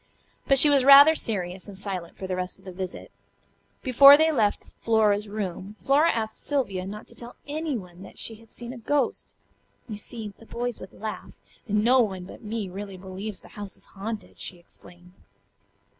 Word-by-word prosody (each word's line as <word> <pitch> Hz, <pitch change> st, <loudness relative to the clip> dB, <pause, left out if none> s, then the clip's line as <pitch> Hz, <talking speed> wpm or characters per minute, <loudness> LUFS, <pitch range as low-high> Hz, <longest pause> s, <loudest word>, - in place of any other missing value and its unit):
But 275 Hz, -, +5 dB
she 290 Hz, -, +7 dB
was 280 Hz, -3 st, +4 dB
rather 280 Hz, +3 st, +9 dB
serious 190 Hz, -, -3 dB
and 200 Hz, -2 st, -10 dB
silent 185 Hz, -4 st, -6 dB
for 190 Hz, -, -6 dB
the 185 Hz, -1 st, -2 dB
rest 180 Hz, 0 st, -4 dB
of 190 Hz, -, -23 dB
the 185 Hz, -, -7 dB
visit. 185 Hz, 0 st, -7 dB, 0.7 s
Before 275 Hz, +2 st, +9 dB
they 320 Hz, +1 st, +3 dB
left 220 Hz, -8 st, +1 dB
Flora's 215 Hz, -2 st, +2 dB
room 200 Hz, -1 st, -5 dB
Flora 295 Hz, +8 st, +3 dB
asked 220 Hz, -1 st, -3 dB
Sylvia 200 Hz, -11 st, -2 dB
not 210 Hz, +2 st, -8 dB
to -, -, -11 dB
tell 240 Hz, 0 st, -11 dB
anyone 260 Hz, -, -4 dB
that -, -, -12 dB
she 225 Hz, -, -4 dB
had 225 Hz, +1 st, -20 dB
seen 240 Hz, +1 st, -7 dB
a 250 Hz, -, -9 dB
"ghost." 275 Hz, +3 st, -1 dB, 0.5 s
"You 215 Hz, -3 st, -6 dB
see, 215 Hz, -1 st, -6 dB
the 225 Hz, -, -16 dB
boys 240 Hz, -1 st, -4 dB
would 185 Hz, -, -10 dB
laugh, 215 Hz, 0 st, -7 dB, 0.3 s
and 210 Hz, 0 st, +1 dB
no 250 Hz, +2 st, +5 dB
one 190 Hz, -5 st, -2 dB
but 180 Hz, -, -12 dB
me 215 Hz, -2 st, -4 dB
really 195 Hz, +1 st, -7 dB
believes 190 Hz, +2 st, -7 dB
the -, -, -16 dB
house 205 Hz, -2 st, -8 dB
is -, -, -18 dB
haunted," 210 Hz, +2 st, -6 dB
she 180 Hz, -, -7 dB
explained. 175 Hz, +1 st, -16 dB
210 Hz, 190 wpm, -26 LUFS, 190-245 Hz, 0.7 s, rather